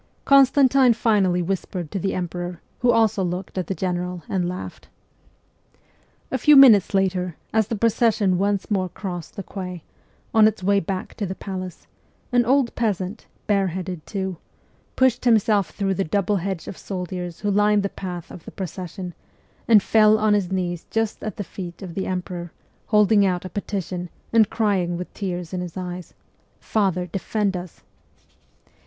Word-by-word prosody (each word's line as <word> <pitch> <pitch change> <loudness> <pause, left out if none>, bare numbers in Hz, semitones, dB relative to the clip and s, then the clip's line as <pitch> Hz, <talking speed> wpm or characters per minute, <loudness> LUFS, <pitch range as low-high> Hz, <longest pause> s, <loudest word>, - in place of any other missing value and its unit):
Constantine 270 -2 +5
finally 200 -6 +2
whispered 180 -2 -3
to 195 - -2
the 195 +2 -1
emperor, 175 -1 -4 0.2
who 245 - +2
also 220 -3 +3
looked 180 +1 -4
at 185 -3 -2
the 195 - -2
general 180 -2 -3
and 180 -2 -1
laughed. 180 +1 -7 1.4
A 260 - -1
few 300 +5 +6
minutes 225 -9 +7
later, 185 -3 0 0.2
as 220 -2 +2
the 230 - -2
procession 215 -4 +2
once 200 +1 0
more 185 -3 +1
crossed 175 -3 -6
the 195 - -5
quay, 180 -3 -7 0.5
on 220 -1 +7
its 215 -3 -2
way 200 +1 +3
back 185 +1 -4
to 205 - -2
the 190 - -4
palace, 185 -3 -7 0.5
an 245 -1 +3
old 260 0 +2
peasant, 205 -2 -2 0.2
bareheaded 185 -4 -1
too, 190 -4 -3 0.6
pushed 260 -2 +2
himself 215 -5 +3
through 195 -1 -1
the 195 - 0
double 200 +3 0
hedge 190 -1 -4
of - - -7
soldiers 180 -2 -5
who 205 -1 0
lined 205 0 +3
the - - +1
path 180 -3 -7
of 170 - -10
the - - -7
pro 190 - -4
cession, 180 +1 -7 0.5
and 215 -4 +6
fell 215 -1 +5
on 215 -1 +2
his 195 -3 0
knees 175 -2 -2
just 225 -1 -1
at 215 -3 -5
the 205 - -3
feet 180 -1 -8
of 180 -3 -7
the 190 +2 -3
emperor, 180 -2 -4 0.4
holding 210 -1 +4
out 185 -2 0
a - - -5
petition, 185 -3 -4 0.2
and 220 -2 +5
crying 190 -6 0
with 180 - -7
tears 180 -3 -4
in 180 - -2
his 180 -1 -7
eyes, 180 -1 -6 0.3
' - - -40
Father, 190 -4 0
defend 195 +2 -2
us 180 -1 -8
190 Hz, 170 wpm, -23 LUFS, 180-215 Hz, 1.4 s, minutes